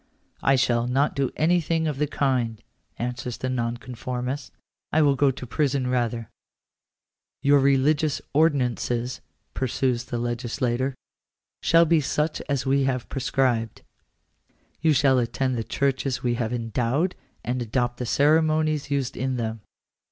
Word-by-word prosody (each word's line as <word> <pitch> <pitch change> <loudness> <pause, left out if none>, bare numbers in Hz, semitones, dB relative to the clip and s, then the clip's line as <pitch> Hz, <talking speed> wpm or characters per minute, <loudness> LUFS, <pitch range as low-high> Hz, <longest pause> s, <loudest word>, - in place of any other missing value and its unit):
" - - -38
I - - +6
shall 120 -2 +2
not 135 +4 +1
do 135 -1 +1
anything 165 0 +1
of 145 -3 -3
the 150 - +1
kind," 125 -6 0 0.4
answers 120 0 -4
the 130 - -3
nonconformist; 125 +2 -4 0.2
" - - -64
I 155 +1 +4
will 140 -2 +4
go 140 +1 +3
to 130 -1 -5
prison 140 +1 0
rather." 120 -3 -1 0.5
" - - -64
Your 140 0 +5
religious 140 +2 +2
ordinances," 125 -5 +1 0.3
pursues 125 -1 -1
the 125 -2 -4
legislator, 120 +2 -1 0.3
" - - -64
shall 165 0 +5
be 165 -1 +3
such 150 +2 -1
as 140 -2 0
we 135 0 +2
have 130 -3 -2
prescribed. 125 -4 0 1.0
You 160 0 +4
shall 135 -2 +4
attend 130 +2 -1
the 115 - -2
churches 135 0 -1
we 120 -1 +1
have 120 -1 -2
endowed, 120 - 0 0.3
and 125 +1 -2
adopt 120 +1 -1
the 125 - -4
ceremonies 155 +1 +2
used 140 -3 -1
in 130 +1 -1
them." 110 -2 -3
130 Hz, 145 wpm, -25 LUFS, 120-145 Hz, 1.0 s, I